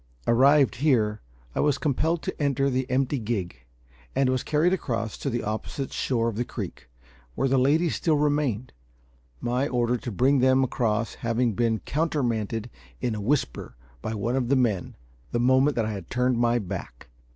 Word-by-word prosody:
Arrived 135 +3 +4
here, 115 -7 +2 0.3
I - - -3
was 145 -2 +2
compelled 160 +3 0
to - - -4
enter 140 -1 +1
the 130 +1 -1
empty 135 +2 +1
gig, 95 - -4 0.5
and 135 -1 +3
was 130 -1 0
carried 155 +4 +2
across 115 - -2
to 140 - -2
the 120 -2 -2
opposite 110 +5 -4
shore 115 -3 0
of 115 -3 -3
the 120 - +1
creek, - - -7 0.5
where - - +1
the 135 0 +3
ladies 155 +6 +2
still 160 -3 +2
remained; 145 -6 0 0.7
my 125 +4 0
order 120 -2 +1
to 120 - -6
bring 130 +7 +3
them 130 +1 +4
across 115 -3 0
having 115 0 +1
been 115 -1 0
countermanded 120 - -1 0.3
in 120 - -1
a 105 - -4
whisper 125 - -1 0.3
by 110 - -3
one 115 +5 -1
of 130 -3 0
the 140 - +4
men, 110 -8 0 0.4
the 120 - 0
moment 130 +4 +4
that 115 - +1
I 110 - -2
had 100 -5 -7
turned 125 -1 +1
my 120 0 +3
back. 90 - -6
125 Hz, 175 wpm, -26 LUFS, 115-135 Hz, 0.7 s, Arrived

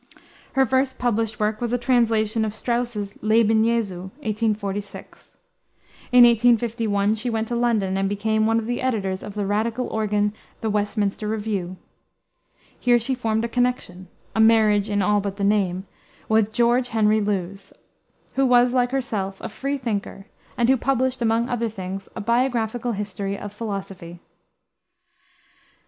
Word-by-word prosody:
Her 270 0 +4
first 260 +2 0
published 225 -3 -1
work 215 +1 -1
was 240 -1 -1
a - - +3
translation 230 -3 +1
of 215 -1 -3
Strauss's 235 -4 -2
Leben 220 0 +3
Jesu, 205 -6 -1 0.2
1846. 210 -2 -4 0.7
In 250 0 +8
1851 230 -3 +3
she 225 +3 -2
went 225 -1 -1
to 240 - -1
London 225 -6 +1
and 195 0 0
became 215 +2 0
one 225 0 +2
of 225 - -1
the 240 +2 -2
editors 200 -7 -1
of 205 - -8
the 205 -1 -1
Radical 225 +5 -1
organ, 210 -1 0 0.3
the 220 -2 -1
Westminster 210 0 -1
Review. 205 -4 -3 1.0
Here 245 0 +4
she 240 +3 -1
formed 225 -2 -1
a - - -1
connection 235 -7 -2 0.3
a - - 0
marriage 220 -2 +4
in 205 -1 +1
all 205 +2 +2
but 200 0 -4
the 200 - -3
name 195 -2 +1 0.4
with 220 -1 +2
George 240 +2 +2
Henry 220 -2 +2
Lewes, 195 -1 -3 0.6
who 270 0 +2
was, 245 0 +4
like 245 -1 +2
herself, 210 -7 -3
a - - -6
freethinker, 230 -5 -4 0.3
and 235 - +2
who 265 +1 +4
published, 260 0 0
among 230 +1 +1
other 235 -2 -1
things, 195 -2 -7
a - - -4
Biographical 235 0 0
History 200 -1 -4
of 205 0 -8
Philosophy. 195 -5 -6
220 Hz, 150 wpm, -23 LUFS, 205-240 Hz, 1.0 s, In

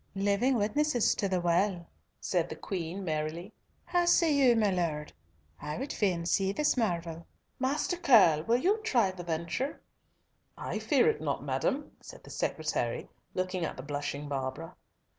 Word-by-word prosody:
"Living 205 +7 +2
witnesses 240 +4 +2
to 200 - -1
the 185 -1 +1
Well," 175 +1 +1 0.3
said - - 0
the - - -5
Queen 185 0 -4
merrily. 155 +2 -3 0.3
"How 350 -1 +1
say 340 -2 +4
you, 265 -4 +5
my 215 -3 +3
Lord? 160 -5 -2 0.5
I 150 0 -4
would 270 +4 -4
fain 180 -5 0
see 190 +3 +2
this 300 +9 +1
marvel. 170 -7 -2 0.3
Master 285 +7 0
Curll, 195 - +6
will 235 +1 +3
you 390 - +2
try 235 - +2
the 185 -1 -8
venture?" 170 - -3 0.8
"I - - -3
fear 460 - +3
it 455 - +1
not, - - -2
madam," 285 +2 -1
said - - -12
the - - -12
secretary, - - -2 0.3
looking 185 -1 -1
at - - -3
the 130 - -7
blushing 145 0 -4
Barbara. 140 +4 -4
190 Hz, 160 wpm, -30 LUFS, 165-255 Hz, 0.8 s, Curll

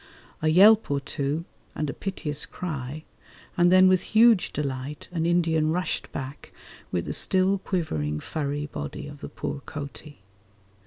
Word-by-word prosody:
A 155 - +1
yelp 205 +7 +6
or 140 0 +1
two 145 +3 -3 0.3
and 150 - -2
a 140 - -3
piteous 150 -7 -3
cry, 155 -3 -5 0.5
and 175 0 +4
then 185 0 +7
with 185 -1 +4
huge 225 -2 +4
delight 140 0 -4
an 165 -2 -1
Indian 165 -3 +2
rushed 180 +3 -2
back 135 0 -7 0.4
with 85 -1 -1
the - - -3
still 190 +1 +3
quivering 80 - -2
furry 145 - -3
body 75 - -6
of 145 -1 -10
the - - -6
poor 145 - -5
coati. 145 -4 -8
155 Hz, 150 wpm, -26 LUFS, 140-180 Hz, 0.5 s, then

